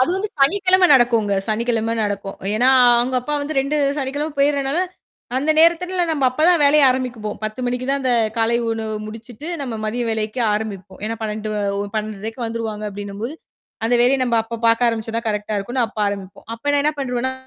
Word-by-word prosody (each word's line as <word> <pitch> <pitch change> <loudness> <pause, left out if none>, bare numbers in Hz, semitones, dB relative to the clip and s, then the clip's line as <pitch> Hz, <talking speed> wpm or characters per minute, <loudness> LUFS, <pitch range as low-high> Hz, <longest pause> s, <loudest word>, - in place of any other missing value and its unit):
அது 255 - +3
வந்து 405 +2 -2
சனிக்கிழமை 370 +5 +4
நடக்கும்ங்க. 235 -6 +3
சனிக்கிழமை 230 0 0
நடக்கும். 200 -1 -4 0.2
ஏன்னா, 245 +4 +3 0.3
அவங்க 245 +2 +1
அப்பா 295 +4 -3
வந்து 290 +1 -4
2 275 +3 -1 0.2
சனிக்கிழமை 285 +3 -3
போயிட்றனால, 280 +2 +1 0.6
அந்த 290 +4 +1
நேரத்துல 340 +3 +4
எல்லாம் 350 -2 +1
நம்ம 285 -4 0
அப்பதான் 320 +5 +3
வேலையை 290 +1 +6
ஆரம்பிப்போம். 245 -5 -3
10:00 215 +4 -4
மணிக்கு 250 +1 -2
தான் 280 0 0
அந்த 255 -1 +1 0.3
காலை 230 +1 +2
உணவு 220 -1 -3
முடிச்சிட்டு, 225 +5 -10 0.2
நம்ம 250 -4 -4
மதிய 230 +3 -2
வேலைக்கு 220 +2 -2
ஆரம்பிப்போம். 200 -3 -6
ஏன்னா 225 +1 -3
12 215 0 -3 0.3
ஒ - - -1 0.2
12:30க்கு 215 +2 -5
வந்துருவாங்க 225 -2 -4
அப்படின்னும்போது, 205 +6 -6 0.5
அந்த 240 - +2
வேலையை 265 +2 +3
நம்ம 235 -2 +1
அப்ப 230 +1 -7
பார்க்க 230 +1 +4
ஆரம்பிச்சா 225 -1 -3
தான் 230 - -3
கரெக்ட்டா 210 0 -2
இருக்கும்னு 240 +5 -1
அப்ப 225 - -12
ஆரம்பிப்போம். 195 -1 -7
அப்போ 230 +5 -14
நான் 285 0 +2
என்ன 300 - +2
பண்றுவேன்னா, 255 -1 -1
240 Hz, 180 wpm, -20 LUFS, 215-275 Hz, 0.6 s, வேலையை